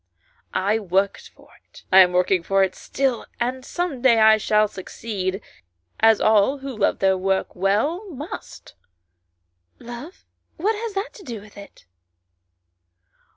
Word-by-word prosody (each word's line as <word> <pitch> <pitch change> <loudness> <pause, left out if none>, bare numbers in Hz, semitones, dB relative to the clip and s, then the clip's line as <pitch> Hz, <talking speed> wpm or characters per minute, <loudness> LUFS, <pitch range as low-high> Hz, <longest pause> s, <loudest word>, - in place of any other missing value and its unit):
" 470 - -40 0.2
I 220 - +2
worked 195 0 -1
for - - -22 0.2
it; - - -16
I 190 - +8
am 180 -1 +7
working 180 0 +2
for 195 +3 +2
it 190 -1 -1
still, 260 +1 -2
and 255 +2 -2
some 335 -3 -3
day 245 -3 +5
I 220 0 +6
shall 215 0 +2
succeed, 195 -1 -5 0.6
as 225 -1 +5
all, 215 +5 +3
who 270 -2 -7
love 210 -2 +1
their 190 -1 +2
work 190 +1 -1
well, 220 - 0
must." 300 +1 -9 1.0
"Love 240 +9 -10 0.3
what 410 +7 +1
has 440 -1 -5
that 390 +5 -3
to 410 - -13
do 235 - -6
with 205 0 -16
it?" 200 - -14
220 Hz, 150 wpm, -22 LUFS, 195-275 Hz, 1.0 s, I